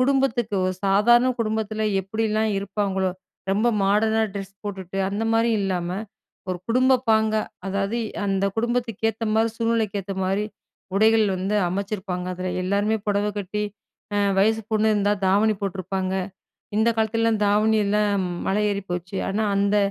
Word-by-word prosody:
குடும்பத்துக்கு 255 -5 +1
ஒரு 185 - +1
சாதாரண 220 +6 +5
குடும்பத்துல 220 -1 -1 0.2
எப்டிலாம் 215 +2 0
இருப்பாங்களோ, 195 -1 -1 0.4
ரொம்ப 215 +5 +2
மாடர்னா 220 +3 +3
டிரஸ் 195 0 -7
போட்டுட்டு, 195 -2 -5
அந்த 200 +3 -2
மாரி 225 +1 +3
இல்லாம, 180 -3 -1 0.6
ஒரு 180 - -2
குடும்பப் 255 +1 +3
பாங்கா, 220 0 +3 0.3
அதாவது 200 +4 -1 0.3
அந்த 195 0 +1
குடும்பத்துக்கு 235 -2 -1
ஏத்த 225 +1 -6
மாரி, 225 +1 +3
சூழ்நிலைக்கு 225 -3 0
ஏத்த 195 +1 -5
மாதிரி 195 +3 0 0.5
உடைகள் 220 +1 +5
வந்து 195 +3 -1
அமச்சிருப்பாங்க. 190 -1 -3
அதுல 185 +1 -4
எல்லாருமே 200 +3 +1
புடவ 205 0 +1
கட்டி, 205 +2 -3 0.5
அ - - +2 0.2
வயசுபொண்ணு 220 +1 +2
இருந்தா 205 0 +2
தாவணி 210 +3 +3
போட்ருப்பாங்க. 190 0 -2 0.6
இந்த 220 +1 +3
காலத்துலலாம் 225 0 +1
தாவணி 215 +2 +3
எல்லாம் 205 -2 +1 0.2
மலை 205 +2 +1
ஏறி 200 0 -2
போச்சு. 180 +2 -4
ஆனா 210 +3 0
அந்த 200 +1 +2
210 Hz, 135 wpm, -24 LUFS, 195-220 Hz, 0.6 s, சாதாரண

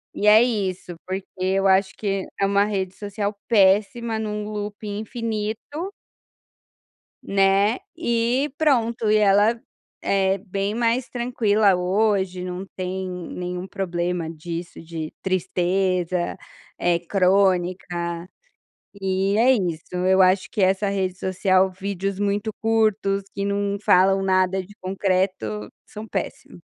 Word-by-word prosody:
E 210 - 0
é 215 +2 +8
isso, 190 -7 -2
porque 190 +1 -3 0.2
eu 190 +1 +1
acho 190 0 +3
que 195 -2 -2
é 195 - +3
uma 200 +1 +3
rede 190 -3 -2
social 205 +1 -4
péssima 215 +2 +3
em 220 - -3
um 210 0 -4
looping 210 0 -5
infinito 225 - -4 1.3
Né, 195 +4 +3 0.2
e 240 +4 0
pronto, 235 -7 +2
e 215 - +4
ela 210 +2 +4 0.4
é 195 0 +2
bem 195 +2 -3
mais 235 +2 +1
tranquila 220 -5 +2
hoje, 190 0 +1
não 180 +1 -5
tem 185 0 -3
nenhum 180 0 -5
problema 175 -3 -2
disso 165 +2 -7
de 160 -1 -6
tristeza, 185 -1 0 0.4
é 175 -1 +2
crônica, 180 -2 +1 0.7
eh, 195 0 0
é 245 +4 +5
isso 175 -9 -1
eu 185 +1 +4
acho 185 -1 +3
que 205 - -1
essa 190 +2 +2
rede 190 -2 -1
social 190 0 +2
vídeos 195 0 -4
muito 205 +1 0
curtos 215 -3 +1
que 200 - -2
não 200 0 -1
falam 195 +1 +4
nada 185 0 +2
de 205 +3 -16
concreto 185 - -1
são 215 +1 -9
péssimo. - - -5
195 Hz, 125 wpm, -23 LUFS, 185-210 Hz, 1.3 s, é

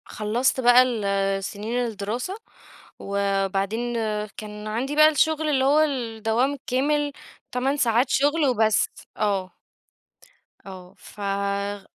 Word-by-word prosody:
خلّصت 230 +5 -1
بقى 245 0 +7
ال 200 -5 -1
سنين 215 +5 -4
الدراسة 230 - -4 0.6
وبعدين 200 +3 -1 0.4
كان 210 0 -8
عندي 245 +7 -2
بقى 305 +1 +7
الشغل 315 +1 +1
اللي 265 -3 +2
هو 290 +3 +4
الدوام 240 -3 0
الكامل 285 +2 -1 0.4
8 265 +3 0
ساعات 240 0 +2
شُغل 290 +3 +2
وبس 220 -4 +2 0.3
آه، 195 -3 -1 1.1
آه، 185 -2 -11
ف - - -15
غ 200 0 -2
225 Hz, 110 wpm, -24 LUFS, 200-265 Hz, 1.1 s, بقى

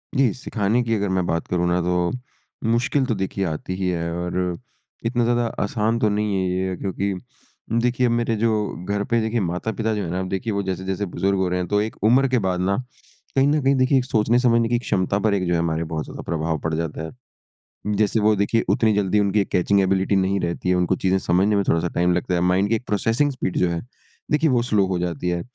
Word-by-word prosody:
जी, 130 -5 +3
सिखाने 115 -1 0
की 115 -1 -1
अगर 100 -2 -1
मैं 95 -1 0
बात 85 0 -1
करूँ 90 -1 0
ना 90 +1 +2
तो 90 0 0 0.6
मुश्किल 130 +3 +1
तो 115 -4 -1
देखिए 95 0 -2
आती 80 +3 -4
ही 95 -1 -2
है 85 -1 -2
और 90 0 -2 0.5
इतना 120 0 +1
ज़्यादा 120 0 +1 0.2
आसान 110 +2 0
तो 105 - +2
नहीं 105 -1 0
है 95 -1 0
ये। 95 0 -1
क्योंकि 100 +1 -2 0.7
देखिए, 125 0 +1
मेरे 120 -1 +1
जो 105 -5 -1
घर 100 0 0
पे 115 +2 +1
देखिए 110 +1 0
माता-पिता 110 +5 -2
जो 105 - -2
हैं 85 - -4
ना 90 - -2
अब 95 -1 -3
देखिए 100 +3 -2
वो 100 0 -1
जैसे-जैसे 95 +2 -3
बुज़ुर्ग 95 +2 -1
हो 95 -1 +1
रहे 90 0 -1
हैं। 90 - -2
तो 105 0 +1
एक 110 - -3
उम्र 130 +5 +5
के 125 -2 +2
बाद 90 -1 0
ना 95 +2 +1 0.6
कहीं 135 +1 +4
न 150 0 +2
कहीं 135 +1 +3
देखिए, 130 +1 +3
एक 125 - +1
सोचने 115 +1 +2
समझने 115 -2 +3
की 120 -1 +2
क्षमता 100 -3 0
पर 105 -1 +1
एक 95 -2 0
जो 90 - +1
है 85 - +2
हमारे 85 -1 0
बहुत 80 -1 -4
ज़्यादा - - -8
प्रभाव 80 -1 -1
पड़ 80 +2 -3
जाता 80 -1 -3
है। - - -7 0.8
जैसे 105 +1 +2
वो 105 0 +3
देखिए, 100 +3 +1
उतनी 110 -2 +3
जल्दी 105 0 +2
उनकी 100 0 +2
कैचिंग 100 +2 +2
एबिलिटी 95 +1 +1
नहीं 95 +1 +1
रहती 85 +1 -2
है। 90 - +3
उनको 90 +1 +1
चीज़ें 95 +1 +1
समझने 95 +5 +2
में 100 - +2
थोड़ा-सा 85 +1 +2
टाइम 90 +1 +2
लगता 90 +1 -1
है। 85 - +1
माइंड 95 +3 +2
के 115 - +3
एक 125 - -5
प्रोसेसिंग 115 +8 +1
स्पीड 125 -8 -3
जो 90 - +2
है 85 +6 -3 0.5
देखिए 150 +1 +3
वो 120 -2 +3
स्लो 105 -5 +2
हो 95 -1 -1
जाती 85 -1 -3
है। 85 -1 -1
100 Hz, 235 wpm, -22 LUFS, 90-115 Hz, 0.8 s, उम्र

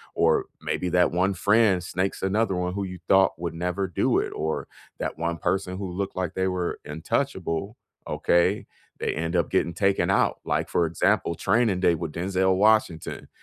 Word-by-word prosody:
or - - +3 0.2
maybe 90 - -2
that 90 0 +3
one 95 +3 +1
friend 100 -1 +3
snakes 95 +2 -2
another 100 +1 +1
one 90 0 -2
who 100 +1 -2
you 90 -1 -6
thought 95 -2 +4
would 85 -1 -3
never 90 +3 -2
do 85 - +1
it, - - -3
or 80 0 -2 0.3
that - - -3
one 85 +1 -2
person 95 +2 -1
who 95 -1 -4
looked 95 +2 -4
like 90 -3 -2
they 95 0 0
were 90 -2 -2
untouchable, 90 - -2 0.3
okay, 90 +4 +2 0.3
they - - -1
end 85 +3 -2
up 85 -3 +1
getting 85 - +1
taken 95 +2 +1
out. - - +2
Like, - - -1
for 85 - +2
example, 85 +1 +1
Training 110 0 +2
Day 85 -2 +3
with 80 -1 -4
Denzel 95 +2 +1
Washington. 105 -5 +1
90 Hz, 180 wpm, -25 LUFS, 85-95 Hz, 0.3 s, thought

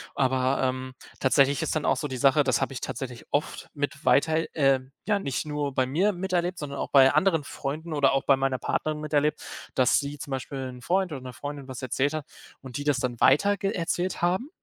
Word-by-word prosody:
Aber, 130 0 +1
ähm, 130 0 -2 0.3
tatsächlich 140 +1 +3
ist - - -1
dann 155 - -1
auch - - +3
so 150 - -2
die 130 -2 -5
Sache 140 +2 +4
das 130 -2 +1
habe 135 - -1
ich - - -6
tatsächlich 125 -3 -6
oft 145 - -2
mit 145 0 -3
weiter 160 +3 +3
äh, 135 -3 +4 0.3
ja, 205 -2 +2
nicht 140 -5 -3
nur 145 -1 -2
bei 130 - +2
mir 185 +10 +1
miterlebt, 180 -1 -1
sondern 140 -2 -5
auch - - -3
bei 135 -1 +6
anderen 160 -1 +3
Freunden 155 +5 -5
oder 140 -2 +3
auch 135 - +1
bei 135 - +5
meiner 135 -1 0
Partnerin 155 +3 -2
miterlebt, 150 0 0 0.4
dass 130 - +4
sie 145 +1 -5
zum 140 - -8
Beispiel 135 0 -4
'n 125 0 -10
Freund 185 +4 0
oder 135 -3 -5
'ner 125 -1 -8
Freundin 145 +1 -7
was 130 -1 -7
erzählt 135 +4 0
hat 155 -2 -4 0.4
und 130 -1 -7
die 145 - -5
das 145 -3 +2
dann 125 -2 -3
weiter 200 +10 +4
ge 195 +1 -2
erzählt 180 0 -2
haben, 185 - +1
145 Hz, 220 wpm, -26 LUFS, 130-160 Hz, 0.4 s, bei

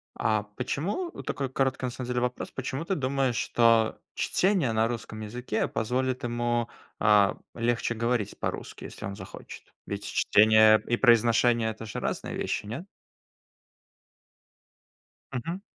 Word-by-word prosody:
А 110 -2 +1
почему? 190 - -2
Такой 135 -1 -3
короткий 130 -1 0
на - - -1
самом 125 0 -6
деле 125 0 -1
вопрос. 125 0 -3
Почему 130 +5 -4
ты 195 - 0
думаешь, 135 -3 0
что 115 -1 +3 0.2
чтение 185 - +1
на 110 +1 +2
русском 115 -2 -5
языке 110 +1 -2
позволит 125 +3 -1
ему, 120 0 -1 0.3
а, 105 -2 +4 0.2
легче 120 0 0
говорить 115 -2 -1
по-русски, - - -5
если - - -8
он 100 - -5
захочет? - - -11
Ведь - - -5
чтение 110 0 +5
и 120 - +1
произношение 115 -1 +4
это 110 +1 -9
же 105 - -5
разные - - -3
вещи, - - -2
нет? 140 - -6 2.5
Мгм. 165 +10 -4
120 Hz, 135 wpm, -27 LUFS, 110-130 Hz, 2.5 s, чтение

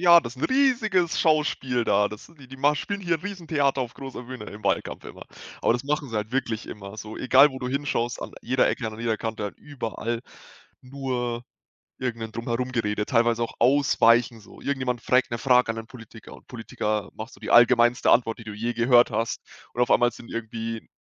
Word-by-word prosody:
„Ja, 170 -1 +8
das 120 +2 -8
'n 130 - -3
riesiges 235 -10 +2
Schauspiel 140 -6 +1
da. 105 +1 +3
Das, 105 +9 -11
die 130 - -13
die 135 - -10
ma 145 +2 +3
spielen 200 +7 -4
hier 170 -3 0
'n - - -20
riesen 190 -5 -7
Theater 140 -4 +1
auf 120 -1 -4
großer 135 -2 -8
Bühne 125 -2 -8
im 105 +1 -10
Wahlkampf - - -1
immer.“ - - -10 0.4
Aber - - +4
das 120 +3 -3
machen 145 -1 -1
sie 115 - -4
halt 105 +3 -3
wirklich 115 -5 -2
immer, 100 0 -9
so 110 0 -8
egal 135 +3 +6
wo 130 - -7
du 125 - -4
hinschaust, 130 -3 -2
an - - -7
jeder 130 +2 +2
Ecke, 115 - -2
an 110 0 -6
jeder 115 -1 0
Kante, 110 -1 -4
halt 105 - -6
überall 120 -4 -4 0.6
nur 125 -3 -3 0.6
irgendein 115 -3 -4
Drumherum-Gerede, 115 -3 -2
teilweise 120 -2 +2
auch - - -5
Ausweichen. 120 -3 +4
So 100 - -16
irgendjemand 130 -4 -2
fragt 125 -1 +2
'ne 115 - -1
Frage 125 -2 +3
an - - -8
'nen 115 0 -7
Politiker 115 -3 -13
und - - -16
Politiker 110 -3 -3
macht - - -8
so - - -16
die - - -5
allgemeinste 120 0 +5
Antwort, 115 -2 +3
die - - -9
du 105 - -6
je 115 +3 -2
gehört 120 0 +4
hast 115 +1 -2 0.3
und 120 - -1
auf 120 - +2
einmal 120 0 +4
sind 115 - -13
irgendwie 115 0 -5
120 Hz, 205 wpm, -25 LUFS, 115-135 Hz, 0.6 s, Ja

